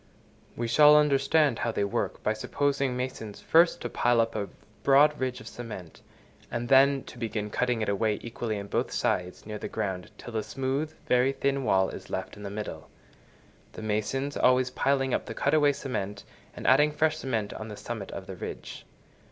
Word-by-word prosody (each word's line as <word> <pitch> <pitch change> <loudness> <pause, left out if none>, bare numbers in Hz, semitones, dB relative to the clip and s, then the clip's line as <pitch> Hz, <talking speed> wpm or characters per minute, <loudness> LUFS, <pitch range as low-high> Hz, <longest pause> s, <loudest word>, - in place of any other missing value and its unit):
We 120 - -2
shall 150 +5 +7
understand 145 -2 +3
how 115 - 0
they 100 - -1
work, 100 - -2
by 110 - +2
supposing 140 +3 -1
masons 125 -5 -5
first 165 +1 +4
to 120 - -3
pile 120 0 +2
up 115 0 +1
a 105 -2 -2 0.3
broad 145 +2 +5
ridge 130 -1 -2
of - - -11
cement, 105 -9 -8 0.5
and 120 0 -3
then 135 0 +5
to 120 - -12
begin 110 -3 -3
cutting 125 -1 0
it - - -2
away 105 +1 +1
equally 115 -2 -3
on 100 - -6
both 100 - -1
sides 90 0 -1
near 105 0 -6
the - - -4
ground, 95 -2 -3
till 120 - -9
a - - +1
smooth, 135 +6 -2
very 125 +2 +3
thin 140 0 0
wall 95 -4 +3
is - - -9
left - - -4
in 105 - -12
the 100 - -5
middle; 100 -6 -6 0.8
the - - -8
masons 110 +7 -1
always 125 0 +3
piling 135 -1 +1
up - - -1
the - - -6
cut 140 - +1
away 150 -2 +5
cement, 115 -8 -4 0.3
and - - -8
adding 145 +4 +5
fresh 155 +1 +1
cement 110 -8 -2
on 110 - -7
the 105 -2 -8
summit - - -6
of - - -7
the - - -7
ridge. - - -8
125 Hz, 195 wpm, -28 LUFS, 110-140 Hz, 0.8 s, shall